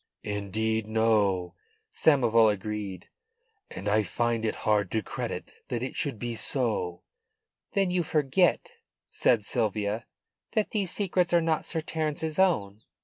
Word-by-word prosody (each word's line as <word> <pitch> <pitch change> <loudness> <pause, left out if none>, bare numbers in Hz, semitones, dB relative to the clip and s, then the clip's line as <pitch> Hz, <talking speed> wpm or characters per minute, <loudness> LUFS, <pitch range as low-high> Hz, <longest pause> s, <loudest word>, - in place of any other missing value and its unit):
"Indeed 110 +2 -1
no," 105 -5 +2 0.4
Samoval 115 -7 +4
agreed. 100 -2 -5 0.6
"And - - -7
I 110 +1 +3
find 115 +4 -1
it 110 - 0
hard 105 -3 +2
to 110 -1 -1
credit - - -5 0.2
that 120 -1 -3
it 130 - -4
should 140 -7 -2
be 120 +2 -4
so." 110 -8 -1 0.7
"Then 195 -2 +2
you 180 0 +2
forget," 155 +2 +2 0.4
said 110 -4 +2
Sylvia, 110 0 -1 0.5
"that 215 -2 0
these 200 -4 -1
secrets 180 -2 +1
are - - +6
not 160 -2 0
Sir 160 - -1
Terence's 155 +1 -2
own. 110 - +2
115 Hz, 135 wpm, -28 LUFS, 105-155 Hz, 0.7 s, are